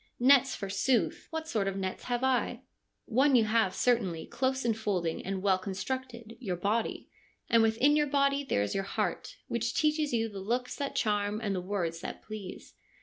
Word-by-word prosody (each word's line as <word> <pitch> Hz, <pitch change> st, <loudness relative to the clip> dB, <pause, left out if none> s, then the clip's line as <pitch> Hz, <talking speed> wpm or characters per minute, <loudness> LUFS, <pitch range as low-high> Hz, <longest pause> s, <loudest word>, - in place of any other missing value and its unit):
1 245 Hz, -, 0 dB
Nets, 275 Hz, -1 st, +6 dB
forsooth! 245 Hz, -, 0 dB
What 320 Hz, -1 st, -4 dB
sort 215 Hz, -9 st, 0 dB
of 195 Hz, 0 st, -2 dB
nets 190 Hz, -1 st, -4 dB
have 245 Hz, 0 st, -1 dB
I? 265 Hz, -1 st, +1 dB, 0.2 s
' -, -, -51 dB
One 265 Hz, +3 st, +3 dB
you 235 Hz, -, +6 dB
have 215 Hz, -3 st, +2 dB
certainly, 200 Hz, -10 st, +1 dB
close 260 Hz, +1 st, -1 dB
enfolding 205 Hz, -7 st, -1 dB
and 190 Hz, 0 st, -3 dB
well 190 Hz, -2 st, +3 dB
constructed, 235 Hz, +4 st, -5 dB
your 195 Hz, -8 st, -2 dB
body. 210 Hz, +6 st, -1 dB, 0.4 s
And 230 Hz, -1 st, +6 dB
within 225 Hz, +6 st, +4 dB
your 295 Hz, -1 st, +3 dB
body 280 Hz, 0 st, +2 dB
there 100 Hz, -, 0 dB
is 100 Hz, -, -2 dB
your 195 Hz, -, -1 dB
heart, 195 Hz, -, -3 dB
which -, -, -2 dB
teaches 305 Hz, -1 st, +1 dB
you 225 Hz, -2 st, +1 dB
the 200 Hz, -3 st, -7 dB
looks 240 Hz, +6 st, -2 dB
that 280 Hz, -1 st, -3 dB
charm 210 Hz, 0 st, 0 dB
and 205 Hz, -3 st, -2 dB
the 185 Hz, -, -2 dB
words 180 Hz, -3 st, -2 dB
that -, -, -7 dB
please. 215 Hz, -4 st, -8 dB
225 Hz, 190 wpm, -30 LUFS, 195-260 Hz, 0.4 s, Nets